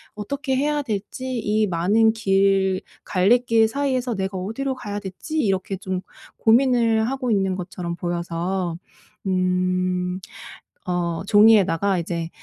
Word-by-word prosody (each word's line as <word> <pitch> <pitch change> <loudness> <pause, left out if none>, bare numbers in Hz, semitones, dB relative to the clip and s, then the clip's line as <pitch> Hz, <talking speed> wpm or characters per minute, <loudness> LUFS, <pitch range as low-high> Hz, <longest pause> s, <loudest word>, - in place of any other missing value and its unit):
어떻게 265 +6 -3
해야 295 +2 +1
될지 245 +3 -4
이 215 0 +1
많은 200 +6 +3
길 195 -3 +2 0.2
갈림길 225 +4 +3
사이에서 255 -2 -1
내가 190 0 -3
어디로 230 +9 -3
가야 205 -5 -5
될지 205 - -5
이렇게 195 -5 0
좀 185 -1 -4 0.4
고민을 230 -2 +3
하고 260 -2 -2
있는 195 -3 +1
것처럼 180 -1 -5
보여서. 175 0 -3 0.5
음. 185 0 0 0.7
어 175 -2 -1
종이에다가 200 -3 +4
이제 170 -1 -3
195 Hz, 255 characters per minute, -22 LUFS, 185-230 Hz, 0.7 s, 종이에다가